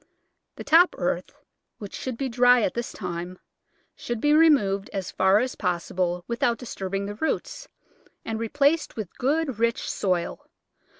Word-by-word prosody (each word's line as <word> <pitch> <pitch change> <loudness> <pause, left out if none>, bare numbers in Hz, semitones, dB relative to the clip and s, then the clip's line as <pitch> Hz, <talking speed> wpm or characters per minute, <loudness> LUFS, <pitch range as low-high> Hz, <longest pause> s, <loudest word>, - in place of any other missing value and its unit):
The - - -8
top 340 +3 +5
earth - - -2 0.3
— - - -56
which 205 -2 -9
should 255 -3 -5
be 275 - -2
dry 245 0 +4
at - - 0
this 235 -1 -4
time 180 -1 -6 0.3
— - - -43
should 240 -2 -4
be 295 +5 +3
removed 265 -12 +4
as 195 -3 -4
far 190 +1 +3
as 250 +4 0
possible 180 -1 -2
without 235 0 0
disturbing 195 -5 -4
the 205 - -5
roots, 320 - -3 0.6
and 225 0 -3
re 230 -1 -3
placed 290 +4 +1
with 210 -6 -6
good, 275 -2 0
rich 230 0 0
soil. 180 -3 -2
225 Hz, 165 wpm, -25 LUFS, 190-260 Hz, 0.6 s, top